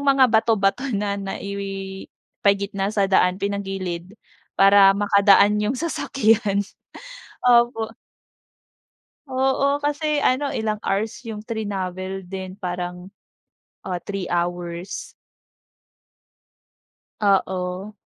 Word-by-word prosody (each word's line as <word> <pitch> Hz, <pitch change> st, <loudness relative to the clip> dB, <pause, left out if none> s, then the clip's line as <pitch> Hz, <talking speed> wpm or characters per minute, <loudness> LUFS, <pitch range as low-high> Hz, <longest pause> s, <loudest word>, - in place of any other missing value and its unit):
mga 270 Hz, -4 st, +4 dB
bato-bato 220 Hz, +3 st, +2 dB
na 200 Hz, 0 st, -2 dB
naipagitna 195 Hz, 0 st, -3 dB
sa 205 Hz, -1 st, +1 dB
daan 185 Hz, -1 st, +3 dB
pinagilid, 195 Hz, -2 st, -4 dB, 0.4 s
para 195 Hz, 0 st, +7 dB
makadaan 200 Hz, 0 st, +5 dB
yung 215 Hz, +5 st, 0 dB
sasakyan, 225 Hz, -10 st, +1 dB, 0.8 s
opo. 235 Hz, -2 st, +3 dB, 1.3 s
Oo, 270 Hz, +2 st, +1 dB
kasi 295 Hz, +1 st, 0 dB
ano 275 Hz, +2 st, +1 dB
ilang 215 Hz, -1 st, -1 dB
hours 215 Hz, +5 st, -2 dB
yung 215 Hz, -2 st, -6 dB
trinavel 195 Hz, -4 st, -4 dB
din 185 Hz, 0 st, -7 dB
parang, 180 Hz, -1 st, -5 dB, 0.8 s
ah, 180 Hz, -2 st, -3 dB
3 195 Hz, -2 st, -4 dB
hours. 175 Hz, +1 st, -3 dB, 2.1 s
Oo. 190 Hz, -1 st, 0 dB
200 Hz, 85 wpm, -22 LUFS, 190-225 Hz, 2.1 s, para